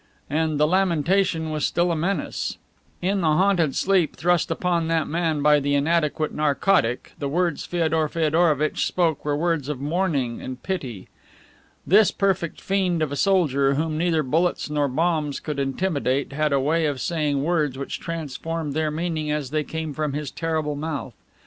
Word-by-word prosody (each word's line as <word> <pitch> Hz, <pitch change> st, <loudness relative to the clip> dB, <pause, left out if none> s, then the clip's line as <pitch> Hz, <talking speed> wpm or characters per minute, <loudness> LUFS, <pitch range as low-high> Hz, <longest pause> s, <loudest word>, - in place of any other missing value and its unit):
And 155 Hz, -1 st, 0 dB
the 150 Hz, -, +5 dB
lamentation 170 Hz, -1 st, +1 dB
was 155 Hz, -1 st, -2 dB
still 175 Hz, 0 st, +1 dB
a -, -, 0 dB
menace. 180 Hz, +5 st, -2 dB, 0.5 s
In 195 Hz, +2 st, +1 dB
the 165 Hz, -, +1 dB
haunted 170 Hz, -2 st, +2 dB
sleep 185 Hz, -4 st, +2 dB
thrust 175 Hz, 0 st, +1 dB
upon 170 Hz, -2 st, 0 dB
that 165 Hz, -1 st, +1 dB
man 160 Hz, -2 st, -1 dB
by 150 Hz, 0 st, +5 dB
the 145 Hz, 0 st, 0 dB
inadequate 155 Hz, +1 st, +1 dB
narcotic 150 Hz, -3 st, +1 dB
the 140 Hz, -, -2 dB
words 170 Hz, 0 st, 0 dB
Feodor 160 Hz, -3 st, 0 dB
Feodorovitch 155 Hz, -2 st, +1 dB
spoke 165 Hz, -5 st, 0 dB
were 145 Hz, -1 st, 0 dB
words 165 Hz, -3 st, 0 dB
of 150 Hz, -4 st, -3 dB
mourning 145 Hz, -5 st, -1 dB
and 130 Hz, 0 st, -7 dB
pity. 130 Hz, -, -4 dB, 0.8 s
This 205 Hz, +3 st, +5 dB
perfect 190 Hz, -5 st, -1 dB
fiend 185 Hz, -4 st, 0 dB
of 150 Hz, -, -2 dB
a -, -, -2 dB
soldier, 140 Hz, -6 st, +2 dB
whom 155 Hz, +1 st, -1 dB
neither 165 Hz, -1 st, +1 dB
bullets 160 Hz, +3 st, 0 dB
nor 145 Hz, -1 st, +1 dB
bombs 155 Hz, +1 st, 0 dB
could 150 Hz, -2 st, -4 dB
intimidate, 140 Hz, -2 st, -1 dB
had 150 Hz, +1 st, 0 dB
a 140 Hz, -, +3 dB
way 155 Hz, +4 st, +1 dB
of 140 Hz, -3 st, -2 dB
saying 150 Hz, -1 st, 0 dB
words 150 Hz, -5 st, 0 dB
which 140 Hz, -, -5 dB
transformed 165 Hz, -1 st, -4 dB
their 155 Hz, +1 st, 0 dB
meaning 155 Hz, -1 st, -2 dB
as 150 Hz, -3 st, -2 dB
they 155 Hz, 0 st, 0 dB
came 160 Hz, +1 st, -5 dB
from 150 Hz, -1 st, -2 dB
his 150 Hz, -1 st, -4 dB
terrible 155 Hz, -3 st, -2 dB
mouth. 150 Hz, -1 st, -4 dB
155 Hz, 170 wpm, -23 LUFS, 145-170 Hz, 0.8 s, the